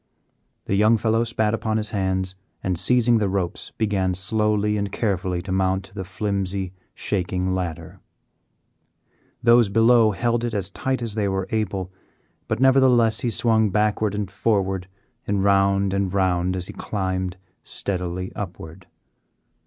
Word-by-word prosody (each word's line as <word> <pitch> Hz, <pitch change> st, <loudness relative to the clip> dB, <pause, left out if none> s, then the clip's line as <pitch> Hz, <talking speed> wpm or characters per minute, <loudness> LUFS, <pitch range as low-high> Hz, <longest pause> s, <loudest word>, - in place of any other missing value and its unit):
The -, -, -2 dB
young 105 Hz, +3 st, +4 dB
fellow 115 Hz, +1 st, +1 dB
spat 110 Hz, -2 st, 0 dB
upon 110 Hz, -1 st, -1 dB
his 105 Hz, -1 st, -3 dB
hands 95 Hz, -2 st, -1 dB, 0.3 s
and, 95 Hz, -1 st, 0 dB
seizing 120 Hz, +6 st, +3 dB
the 100 Hz, -2 st, 0 dB
ropes, 95 Hz, -3 st, -3 dB
began 95 Hz, -4 st, 0 dB
slowly 105 Hz, +2 st, 0 dB
and 100 Hz, -1 st, -2 dB
carefully 95 Hz, -5 st, -1 dB
to 95 Hz, -, -6 dB
mount 95 Hz, 0 st, 0 dB
the 95 Hz, -2 st, -5 dB
flimsy, 95 Hz, -1 st, -3 dB, 0.2 s
shaking 95 Hz, -1 st, -1 dB
ladder. 90 Hz, -4 st, -4 dB, 1.4 s
Those 120 Hz, -2 st, +5 dB
below 115 Hz, +2 st, +5 dB
held 120 Hz, +3 st, 0 dB
it 120 Hz, -2 st, -2 dB
as 100 Hz, -1 st, -3 dB
tight 130 Hz, +2 st, -2 dB
as 115 Hz, -3 st, -3 dB
they 105 Hz, -2 st, 0 dB
were 95 Hz, -1 st, -1 dB
able, 100 Hz, -4 st, -2 dB, 0.6 s
but -, -, -1 dB
nevertheless 130 Hz, -4 st, +4 dB
he 120 Hz, -, -1 dB
swung 110 Hz, -1 st, +2 dB
backward 105 Hz, 0 st, +1 dB
and 100 Hz, -2 st, -3 dB
forward 95 Hz, -3 st, 0 dB, 0.4 s
and 100 Hz, -1 st, 0 dB
round 100 Hz, 0 st, +3 dB
and 100 Hz, -1 st, 0 dB
round 95 Hz, -1 st, +1 dB
as 90 Hz, -1 st, -4 dB
he -, -, -8 dB
climbed 95 Hz, -2 st, -3 dB, 0.2 s
steadily 90 Hz, -1 st, -4 dB
upward. 90 Hz, -2 st, -8 dB
100 Hz, 145 wpm, -23 LUFS, 95-110 Hz, 1.4 s, Those